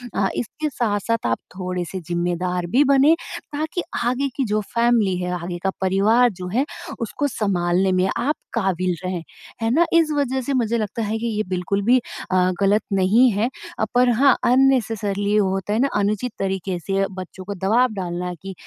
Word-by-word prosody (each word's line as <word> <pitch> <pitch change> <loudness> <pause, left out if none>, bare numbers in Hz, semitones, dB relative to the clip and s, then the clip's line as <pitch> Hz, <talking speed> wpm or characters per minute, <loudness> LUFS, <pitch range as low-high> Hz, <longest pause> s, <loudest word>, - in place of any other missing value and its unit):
अ, 195 - +2
इसके 300 +6 -3
साथ-साथ 230 - -1
आप 115 0 +1 0.2
थोड़े-से 185 0 -3
ज़िम्मेदार 175 +1 -1
भी 285 - +6
बनें 275 +4 +6 0.4
ताकि 315 +4 -2 0.2
आगे 260 +3 0
की 270 - +1
जो 210 0 0
फैमिली 235 -6 +3
है, 180 0 -3
आगे 175 0 -4
का 195 - +2
परिवार 210 +6 +4
जो 180 - -4
है 275 - +3 0.3
उसको 235 +5 -2
सँभालने 190 -5 +1
में 190 - +1
आप 295 +4 0 0.2
काबिल 185 -5 0
रहें। 185 -2 -3 0.4
है 225 - +1
ना? 335 +6 +4
इस 325 -2 +4
वज़ह 265 -2 0
से 275 +3 -2
मुझे 235 -3 +1
लगता 215 +1 -3
है 220 +1 -1
कि 235 - -2
ये 215 -1 -1
बिल्कुल 185 +2 -1
भी 245 +4 +5 0.3
अ, 185 0 +3
गलत 200 +2 +3
नहीं 205 +7 +4
है। 215 +5 0 0.3
अ, 220 - +2
पर 250 0 +5
हाँ, 260 +3 +5
अननेसेसरीली 225 -6 +2
होता 195 0 +1
है 220 - +1
ना, 275 - +3
अनुचित 210 +4 0
तरीके 190 -1 -2
से 195 +2 0
बच्चों 185 0 -8
को 200 - -4
दवाब 220 +6 +2
डालना 180 -2 -3
कि 195 0 -7
205 Hz, 180 wpm, -22 LUFS, 185-245 Hz, 0.4 s, भी